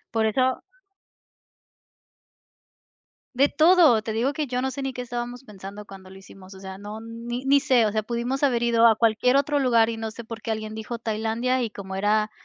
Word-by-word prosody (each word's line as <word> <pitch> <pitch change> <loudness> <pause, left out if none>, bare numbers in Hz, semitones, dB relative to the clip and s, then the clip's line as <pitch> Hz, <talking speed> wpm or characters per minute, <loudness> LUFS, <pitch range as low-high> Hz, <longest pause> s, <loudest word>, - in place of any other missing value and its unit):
Por 220 -1 +2
eso 255 +4 +1 2.7
De 280 +3 +4
todo, 315 -7 +5
te 220 0 -5
digo 240 +6 0
que 300 -1 -3
yo 250 0 -2
no 265 0 -1
sé 275 - -6
ni 270 -1 -3
qué 250 - -5
estábamos 245 +1 -5
pensando 205 -2 -10
cuando 190 -1 -13
lo 190 - -13
hicimos, 190 0 -14
o 190 - -13
sea, 190 0 -8
no 210 +2 -8
ni 235 +2 -6
ni 280 +1 +4
sé, 255 -5 +3
o 210 - 0
sea, 215 +1 0
pudimos 240 +5 -3
haber 240 -4 +2
ido 235 -1 +5
a 220 - +5
cualquier 230 +3 +2
otro 285 +1 +2
lugar 235 -4 +3
y 225 - -4
no 225 0 -4
sé 235 +1 -9
por 225 0 -9
qué 225 - -4
alguien 215 0 -4
dijo 220 +1 -6
Tailandia 225 +3 -1
y 230 - -1
como 190 -2 -8
era 210 +2 +1
230 Hz, 205 wpm, -24 LUFS, 215-255 Hz, 2.7 s, todo